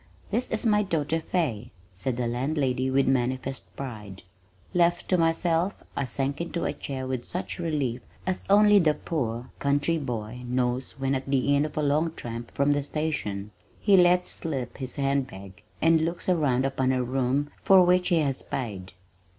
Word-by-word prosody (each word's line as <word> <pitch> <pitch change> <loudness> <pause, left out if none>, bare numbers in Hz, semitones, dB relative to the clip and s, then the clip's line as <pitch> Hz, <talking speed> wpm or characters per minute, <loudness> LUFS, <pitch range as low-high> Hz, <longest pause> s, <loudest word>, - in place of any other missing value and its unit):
"This 235 +5 0
is 220 +2 -2
my 210 -2 +4
daughter 165 -5 0
Fay," 140 - -2 0.2
said 120 +7 -2
the 125 - -1
landlady 130 +1 0
with 135 +1 +2
manifest 130 -5 -1
pride. 105 -8 -7 0.5
Left 175 0 +2
to 185 - +4
myself 165 +3 +1
I 140 - -1
sank 140 +4 -2
into 170 0 -3
a - - 0
chair 130 -2 -5
with 130 -2 -3
such 180 +5 -4
relief 145 -8 -1 0.2
as 185 0 -2
only 205 0 +7
the 155 -4 +3
poor 150 -5 -2
homeless 125 - -15
country 145 +4 +1
boy 120 -3 -4
knows 125 +1 -1
when 135 0 0
at 135 0 -2
the 140 +1 +2
end 145 +2 +2
of 150 - -12
a 150 - +1
long 155 +3 +1
tramp 115 0 -6
from 140 +1 +3
the 145 - 0
station, 140 -10 -3 0.3
he 200 -2 +4
lets 180 0 +4
slip 135 -7 -4
his 130 -2 -6
hand 140 -1 +1
bag 95 -3 -11 0.2
and 165 0 +5
looks 170 +2 -2
around 145 -8 +2
upon 130 -1 +1
a 130 -1 +1
room 135 +3 0
for 190 -2 +7
which 180 0 +3
he 175 - +3
has 135 -3 0
paid. 100 -8 -5
140 Hz, 180 wpm, -27 LUFS, 125-165 Hz, 0.5 s, only